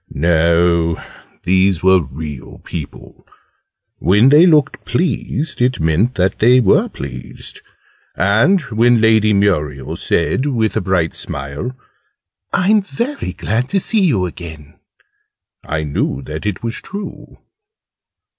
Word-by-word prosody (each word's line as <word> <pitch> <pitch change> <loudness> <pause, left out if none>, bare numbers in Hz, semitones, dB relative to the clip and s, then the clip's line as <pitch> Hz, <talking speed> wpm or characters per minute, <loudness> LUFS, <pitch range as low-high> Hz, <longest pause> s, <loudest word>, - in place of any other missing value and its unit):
No, 85 +1 +2 0.4
these 95 -1 +2
were 95 -1 +5
real 75 -1 -8
people. 75 -4 -9 0.7
When 105 +7 +4
they 155 +5 +6
looked 150 -4 +2
pleased, 155 -3 -2
it 125 +1 +1
meant 80 +10 +1
that 95 +1 0
they 125 +3 +5
were 105 -6 +3
pleased: 65 +1 -9 0.5
and 110 - +3
when 120 -1 +2
Lady 110 -1 +3
Muriel 75 -10 0
said, 135 - -1
with 115 -6 0
a - - 0
bright 90 -3 0
smile, 70 - -6 0.7
"I'm 205 +3 +3
very 235 - -4
glad 115 +7 -2
to 195 - +1
see 215 +3 +2
you 125 - +2
again!", 80 -4 -10 0.8
I 80 0 -3
knew 70 -2 -2
that 80 +6 -6
it 105 +3 -4
was 115 -1 -3
true. 200 0 -9
100 Hz, 120 wpm, -17 LUFS, 80-130 Hz, 0.8 s, they